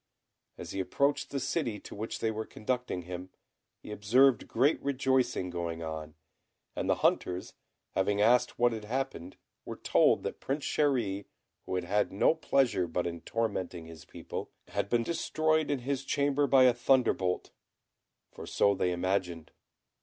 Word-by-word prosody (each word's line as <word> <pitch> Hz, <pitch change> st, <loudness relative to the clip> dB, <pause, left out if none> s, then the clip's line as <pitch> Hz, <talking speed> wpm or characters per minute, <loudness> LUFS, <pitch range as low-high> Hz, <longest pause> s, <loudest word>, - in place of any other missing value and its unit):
As -, -, -7 dB
he 95 Hz, -, -4 dB
approached 140 Hz, +9 st, 0 dB
the 140 Hz, -, -2 dB
city 125 Hz, -9 st, -2 dB
to -, -, -10 dB
which 110 Hz, +2 st, -4 dB
they 110 Hz, -, +1 dB
were 110 Hz, 0 st, -4 dB
conducting 125 Hz, -5 st, -3 dB
him, 90 Hz, +1 st, -7 dB, 0.5 s
he -, -, -11 dB
observed 120 Hz, +5 st, +3 dB
great 135 Hz, +7 st, +2 dB
rejoicing 130 Hz, -8 st, 0 dB
going 85 Hz, -1 st, -4 dB
on; 80 Hz, -1 st, -6 dB, 0.6 s
and -, -, -2 dB
the -, -, +4 dB
hunters 90 Hz, 0 st, 0 dB, 0.4 s
having 100 Hz, +2 st, 0 dB
asked 120 Hz, +4 st, +3 dB
what 120 Hz, 0 st, +4 dB
had 110 Hz, -2 st, -5 dB
happened, 120 Hz, -7 st, -4 dB, 0.3 s
were -, -, -6 dB
told -, -, +3 dB
that -, -, -4 dB
Prince 140 Hz, +2 st, -3 dB
Chéri, 115 Hz, -10 st, 0 dB, 0.4 s
who -, -, -2 dB
had 90 Hz, -, -1 dB
had 100 Hz, +4 st, 0 dB
no 100 Hz, -, +3 dB
pleasure 135 Hz, -, +1 dB
but 85 Hz, +2 st, -2 dB
in 85 Hz, -1 st, -4 dB
tormenting 95 Hz, -7 st, -3 dB
his 80 Hz, -2 st, -11 dB
people, -, -, -7 dB, 0.2 s
had 100 Hz, -, -2 dB
been 120 Hz, +1 st, +2 dB
destroyed 155 Hz, 0 st, 0 dB
in 145 Hz, -, +1 dB
his 135 Hz, +1 st, -2 dB
chamber 145 Hz, +1 st, +1 dB
by 135 Hz, -2 st, +6 dB
a 125 Hz, -1 st, +6 dB
thunderbolt, 120 Hz, -7 st, +1 dB, 0.8 s
for -, -, -10 dB
so 100 Hz, -, +3 dB
they 90 Hz, -2 st, 0 dB
imagined. 90 Hz, -2 st, -2 dB
110 Hz, 160 wpm, -30 LUFS, 90-135 Hz, 0.8 s, by